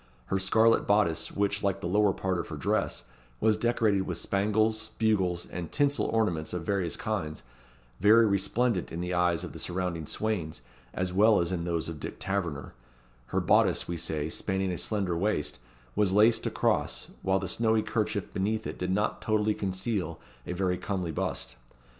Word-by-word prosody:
Her 95 - +2
scarlet 110 +4 +3
bodice, 100 -6 +2
which, 100 0 0
like 100 -3 0
the - - -6
lower 105 +2 +3
part 95 -1 -1
of - - -4
her 80 - -6
dress, 70 - -1 0.4
was 110 0 +3
decorated 110 -3 +2
with - - -3
spangles, 110 +2 +1
bugles, 95 -6 +1
and 85 -2 -6
tinsel 145 -1 +2
ornaments 90 -9 0
of 90 -2 -3
various 95 -4 0
kinds, 90 -9 -3 0.6
very 110 +4 +6
resplendent 100 - +1
in 80 - -4
the 90 +1 -2
eyes 90 -1 +2
of - - -7
the - - -8
surrounding 90 -3 -3
swains, 85 - -2 0.3
as 90 +4 -2
well 105 +2 +5
as 85 +1 0
in 85 -2 -2
those 85 -2 -1
of 80 -2 -6
Dick - - -6
Taverner, 90 -7 -3 0.5
her - - 0
bodice, - - +3
we 85 - -3
say, 80 -2 -2
spanning 95 +3 -2
a 90 - -3
slender 95 -5 -1
waist, 85 - -1 0.4
was 105 -3 +3
laced 110 +3 +4
across, - - 0
while 95 0 +2
the 95 0 -3
snowy 110 +3 +2
kerchief 105 -3 -2
beneath 105 +2 -1
it - - -5
did 90 - -2
not 105 +3 0
totally 110 0 +1
conceal 95 -3 -2 0.3
a - - -2
very 90 0 0
comely 95 -5 -2
bust. 65 -4 -3
95 Hz, 175 wpm, -29 LUFS, 85-105 Hz, 0.6 s, very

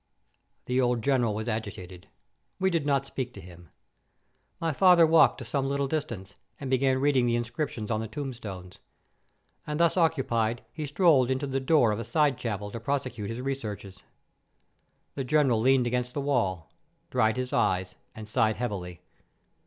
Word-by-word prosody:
The 125 +1 +1
old 120 -2 +1
General 120 -6 +2
was 110 +2 -4
agitated. 100 -5 -5 0.5
We 190 0 +2
did 160 -4 0
not 140 -1 +1
speak 125 -2 -5
to - - -9
him. 85 -1 -13 0.9
My 165 -2 -1
father 180 +1 +6
walked 160 +1 +5
to 130 - -8
some 135 +3 -1
little 140 0 0
distance, 120 -10 -4 0.3
and 135 -2 -5
began 130 0 +2
reading 135 -2 +2
the 120 - +2
inscriptions 120 -2 -3
on 110 - 0
the 110 - -4
tombstones; 110 -8 -7 0.9
and 150 +1 -3
thus 170 +2 +3
occupied, 120 -8 +1
he 155 -2 -4
strolled 145 -5 +4
into 130 +2 -1
the 135 -1 -1
door 130 -4 +3
of 105 - -2
a - - -3
side 140 +3 +1
chapel 105 -3 -4
to 115 - -6
prosecute 125 -4 -3
his 115 +2 -4
researches. 105 -8 -5 1.1
The 135 - -3
General 130 -4 +2
leaned 130 +1 +4
against 125 +1 -2
the 145 - -1
wall, 100 -12 -1 0.4
dried 115 -2 +2
his 130 0 -3
eyes, 90 0 0 0.2
and 110 -1 -9
sighed 110 -1 +1
heavily. 95 -7 -5
125 Hz, 165 wpm, -27 LUFS, 110-140 Hz, 1.1 s, father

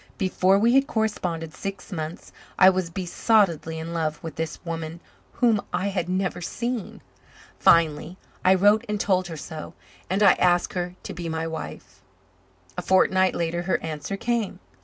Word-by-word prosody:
Before 190 0 +3
we 230 +4 +3
had 270 +1 +4
corresponded 180 -7 -2
six 195 0 -7
months 160 -2 -6 0.3
I 190 0 +8
was 185 -2 -2
besottedly 175 -2 +1
in 165 +1 -5
love 155 -2 -1
with 160 -3 -6
this 160 0 -3
woman 165 0 -5 0.3
whom 230 -5 +2
I 200 +2 -1
had 180 -3 -2
never 185 -1 -1
seen. 235 +4 -4 0.6
Finally, 165 +1 +3 0.3
I 185 +1 +6
wrote 205 +3 +4
and 210 -1 -1
told 185 -3 +1
her 165 -2 -7
so, 160 +2 -8 0.3
and 195 +3 +1
I 195 - +8
asked 175 -1 +2
her 180 0 -3
to - - -6
be 170 -1 -5
my 160 0 -2
wife. 100 - -7 0.8
A - - -2
fortnight 185 0 +3
later 170 0 -1
her 175 - +3
answer 160 +4 -4
came. 230 -4 -1
180 Hz, 160 wpm, -25 LUFS, 165-195 Hz, 0.8 s, I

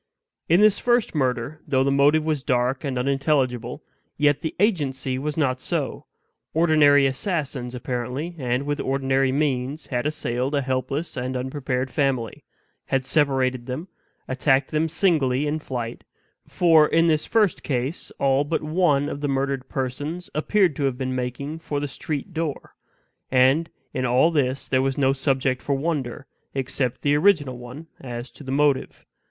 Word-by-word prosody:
In 170 +5 +5
this 210 -1 +5
first 240 -2 +2
murder, 135 +1 -1
though 135 -3 +2
the 140 - +1
motive 145 +3 +4
was 155 -3 0
dark 130 0 0
and 135 -3 -2
unintelligible, 135 -1 0 0.3
yet 145 -1 +3
the 160 - -4
agency 135 - 0
was 150 +2 -3
not 130 -4 +1
so; - - -3 0.5
ordinary 155 -4 +5
assassins 135 - -2
apparently, 125 +7 -4
and 125 0 0
with 145 0 -2
ordinary 135 0 +1
means, 140 +1 -1
had 125 +1 -1
assailed 135 -2 -2
a 140 - +1
helpless 130 +4 -2
and 130 0 -3
unprepared 130 0 -2
family; 135 -6 -1 0.4
had 135 -1 0
separated 130 -3 +1
them; 155 +9 -5 0.4
attacked 135 +1 +1
them 155 +1 +1
singly 150 -6 +2
in 150 +1 -1
flight 120 -5 -5 0.4
(for 160 -4 +5
in 165 +1 +3
this 155 -2 +2
first 215 -6 +2
case 130 +3 -3
all 135 0 +2
but 155 +2 -2
one 155 -3 +2
of 145 - -5
the 145 - 0
murdered 135 -1 -1
persons 145 +7 -4
appeared 175 +1 +2
to 140 - -1
have 130 -2 -1
been 130 -1 -2
making 130 +5 -4
for 145 -3 -3
the 145 - -2
street 145 +5 -5
door); 160 -3 -4 0.6
and 135 +6 +3 0.2
in 130 - -2
all 130 +6 +3
this 135 -3 0
there 130 -1 +2
was 135 0 -1
no 135 -1 +3
subject 130 -1 0
for 140 - 0
wonder, 140 -3 -3 0.3
except 130 -1 -2
the 145 - +3
original 145 -6 +3
one 125 +6 -9
as 120 -1 -7
to - - -13
the 130 - -5
motive. 140 -1 +1
140 Hz, 160 wpm, -24 LUFS, 130-155 Hz, 0.6 s, In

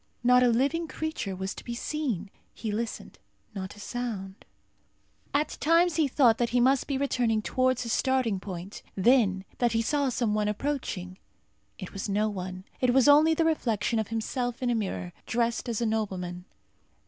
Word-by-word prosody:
Not 250 +1 +6
a 250 - +5
living 280 +8 +1
creature 315 -13 -4
was 190 +1 -4
to - - -10
be 235 - -5
seen. 235 - -3 0.2
He 220 - -4
listened. 225 +2 -4 0.3
Not 190 -1 -6
a - - -14
sound. 205 -4 -5 0.9
At 295 +2 -1
times 335 +2 +3
he 310 -3 +3
thought 245 -4 +4
that 240 -1 +1
he 245 - +2
must 260 +2 +3
be 275 - -1
returning 240 -5 +1
towards 255 +1 +1
his 230 -2 -2
starting 255 -7 +1
point; 185 0 -7
then, 195 -3 +3
that 240 -2 +2
he 225 0 +2
saw 285 +3 +1
some 235 -3 0
one 210 0 +1
approaching. 210 -6 -3 0.6
It 185 - -8
was 195 +1 -4
no 210 +2 +2
one. 185 -2 -6 0.2
It 250 -1 +2
was 265 +1 +5
only 305 +3 +6
the 330 - +2
reflection 230 - +1
of 220 - -1
himself 240 +2 -3
in 245 - +2
a - - +2
mirror, 95 - -3
dressed 235 +1 0
as 230 -1 -2
a - - +1
nobleman. 185 -5 -2
235 Hz, 180 wpm, -28 LUFS, 200-260 Hz, 0.9 s, Not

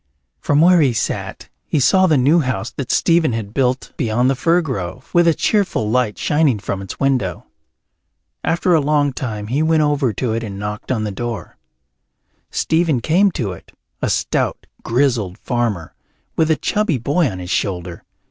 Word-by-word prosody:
From 145 +1 +2
where 175 0 +6
he 135 -5 +3
sat 115 - -3 0.2
he 150 - +1
saw 185 +8 +4
the 155 -4 +3
new 145 +7 +4
house 125 -5 -2
that 130 0 -4
Stephen 165 -6 +3
had 110 -2 -4
built 130 -1 0
beyond 125 0 +1
the - - 0
fir 165 +6 +2
grove, 125 - -5
with 175 0 +4
a 165 - +5
cheerful 185 - 0
light 125 -4 +1
shining 145 -6 +2
from 100 -1 -4
its 95 - -8
window. 125 - 0 1.0
After 175 +2 +1
a 160 - +4
long 145 -1 +1
time 110 -6 -4
he 130 +8 -1
went 160 -1 +3
over 145 -4 +1
to 110 +2 -2
it 115 - -1
and 100 -3 -6
knocked 105 +1 -6
at 120 -4 0
the 105 - -3
door. 120 +2 -5 0.9
Stephen 160 -5 +1
came 175 - +3
to 110 -8 -2
it, 90 - -12 0.3
a - - 0
stout - - -1 0.2
grizzled 115 -7 0
farmer, 115 -9 -2 0.4
with 160 -1 +2
a 160 - +4
chubby 210 -3 0
boy 145 +6 +1
on 95 - -6
his 90 0 -6
shoulder. 90 -3 -2
130 Hz, 175 wpm, -19 LUFS, 110-155 Hz, 1.0 s, where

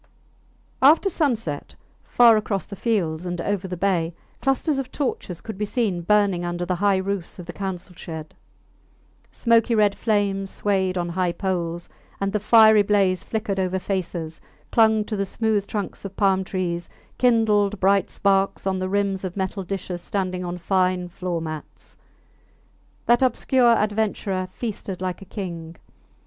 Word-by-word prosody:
After 310 +8 +6
sunset, 225 - -2 0.3
far 235 -2 +6
across 210 -2 -1
the 200 - -8
fields 180 -7 -1
and 175 0 -3
over 195 +1 -2
the 180 -1 -5
bay, 170 -3 0 0.3
clusters 270 +2 +1
of 265 -1 -5
torches 195 - -3
could 220 -3 -8
be 210 - 0
seen 205 -6 -1
burning 200 -1 +2
under 175 0 -2
the 180 0 -1
high 200 +1 +3
roofs 190 -2 -3
of 180 - -8
the 175 - -7
council 190 -2 -5
shed. 160 -3 -8 1.0
Smoky 230 0 +3
red 210 -2 +4
flames 200 -3 0
swayed 190 -3 0
on 175 -1 -1
high 175 0 0
poles, 175 -2 -3 0.3
and 195 0 -1
the 210 - +1
fiery 220 0 +7
blaze 195 -3 +2
flickered 215 -3 -2
over 185 0 0
faces, 175 -4 -4 0.3
clung 220 -2 +4
to 215 - -3
the 200 - 0
smooth 210 0 -1
trunks 205 -2 -4
of 195 -1 -7
palm 190 -2 +3
trees, 175 -2 -3 0.3
kindled 210 -4 +3
bright 195 0 +3
sparks 195 -1 +1
on 190 -1 0
the 185 0 -2
rims 200 -1 0
of 185 0 -5
metal 190 +1 -2
dishes 180 -1 -5
standing 185 -1 -2
on 175 0 -4
fine 180 0 0
floor 175 -1 -3
mats. 155 -1 -8 1.1
That 240 +1 +4
obscure 255 -2 +3
adventurer 205 -3 -1
feasted 205 -5 -5
like 185 0 -3
a - - -9
king. 170 -5 -6
195 Hz, 155 wpm, -23 LUFS, 180-210 Hz, 1.1 s, fiery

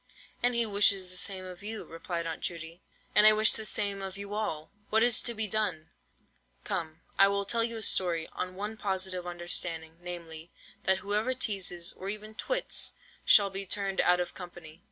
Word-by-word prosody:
"And 245 0 +3
he 235 0 +3
wishes 200 -3 +3
the - - -4
same 185 0 -1
of 180 0 -10
you," 215 +1 -6
replied 170 +1 -5
Aunt 165 -1 -5
Judy, 165 0 -5 0.3
"and 210 - +8
I 215 - +8
wish 215 0 +4
the 220 - -2
same 200 -1 -1
of 190 0 -6
you 200 0 -7
all. 160 -8 -3 0.2
What 220 +1 +3
is 240 -2 +4
to 235 -1 -2
be 220 0 +1
done? 205 -7 -1 0.7
Come, 160 0 -4 0.2
I 195 - +8
will 200 0 0
tell 230 +3 +3
you 230 0 -2
a 220 - -2
story, 170 -5 +4
on 185 0 -4
one 210 +3 -4
positive 190 -3 -1
understanding, 170 -2 -1
namely, 170 -2 -7 0.4
that 190 +1 +2
whoever 215 +5 0
teazes, 185 -7 -1
or 190 - -6
even 215 +1 -6
twits, - - -1 0.3
shall 200 -2 +6
be 195 0 -4
turned 195 0 0
out 180 0 +4
of 180 - -1
the - - -16
company." 175 -3 -10
195 Hz, 195 wpm, -30 LUFS, 175-215 Hz, 0.7 s, and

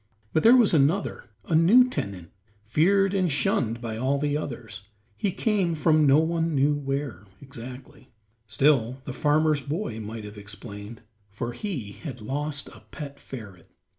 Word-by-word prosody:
But 160 - +3
there 235 +3 +7
was 235 -7 +5
another, 160 +6 +1 0.2
a - - -3
new 195 +11 +6
tenant, 100 - -5 0.3
feared 190 - +3
and 185 -4 +1
shunned 120 -4 0
by 115 -2 -4
all 130 +4 +1
the 145 0 0
others. 120 -7 -5 0.3
He 195 - -1
came 190 -4 0
from 155 -1 +3
no 135 +1 +6
one 165 0 +1
knew 140 +2 +3
where, 135 -7 -4
exactly; 130 0 -11 0.4
still 125 +1 +2
the 130 - -5
farmer's 150 +1 +2
boy 145 - -4
might 110 +1 -6
have 105 0 -9
explained, 105 +1 -9 0.3
for 110 +5 -4
he 130 - -5
had 130 +3 -8
lost 145 +6 -3
a - - -14
pet 140 -2 -8
ferret. 100 -9 -10
140 Hz, 155 wpm, -26 LUFS, 115-160 Hz, 0.4 s, there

